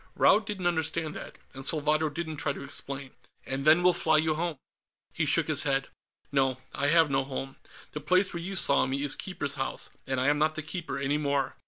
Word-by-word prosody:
Raud 215 - +4
didn't 195 -4 -4
understand 160 -2 0
that, - - -9 0.2
and 135 0 -7
Salvadro 155 +1 +2
didn't 160 0 -5
try 145 -1 -1
to 140 - -8
explain. 140 -1 -6 0.3
"And 135 +1 -4
then 160 +3 +6
we'll 180 0 +5
fly 160 -2 +3
you 155 0 +2
home." 165 -1 -2 0.6
He - - -1
shook - - +3
his - - +3
head. 135 0 0 0.4
"No, 135 -2 +1 0.2
I 140 - 0
have 160 -1 +4
no 135 0 +2
home. 135 0 -6 0.3
The 150 - -6
place 185 +6 +2
where 170 - -4
you 190 +3 -4
saw 190 - +4
me 135 +2 -2
is 145 -1 +5
Keeper's 140 -7 -3
House, 135 - -4 0.2
and 130 -1 -1
I 130 - 0
am 145 0 +2
not 155 +1 +1
the 155 - -4
Keeper 160 -3 -5
any 140 +2 0
more. 140 -2 -1
150 Hz, 215 wpm, -28 LUFS, 135-165 Hz, 0.6 s, then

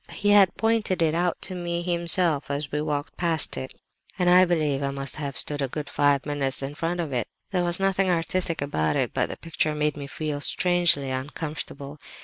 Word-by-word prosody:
He 205 0 +1
had 200 -3 +5
pointed 220 -6 +1
it 155 -1 +2
out 175 +1 0
to 190 - -3
me 175 -1 -3
himself 170 -3 +3
as 140 0 -3
we 150 - -1
walked 145 -1 -3
past 165 -3 +3
it, 130 - -7 0.4
and 180 -2 +3
I 180 +1 +7
believe 155 -5 0
I 140 - -1
must 140 +1 -3
have 140 -3 -5
stood 145 +1 -1
a 135 - 0
good 145 +2 -6
five 145 -1 +2
minutes 140 -2 -1
in 135 +2 -4
front 165 +3 -3
of 155 -5 -3
it. 120 -3 -1 0.2
There 180 -2 +1
was 175 +1 +1
nothing 195 0 +1
artistic 165 -2 0
about 80 - -1
it, - - -1
but - - 0
the - - -6
picture 155 -2 -2
made 150 0 0
me 140 -1 -7
feel 150 0 -4
strangely 175 -5 +2
uncomfortable. 140 +1 -6
155 Hz, 205 wpm, -25 LUFS, 140-175 Hz, 0.4 s, I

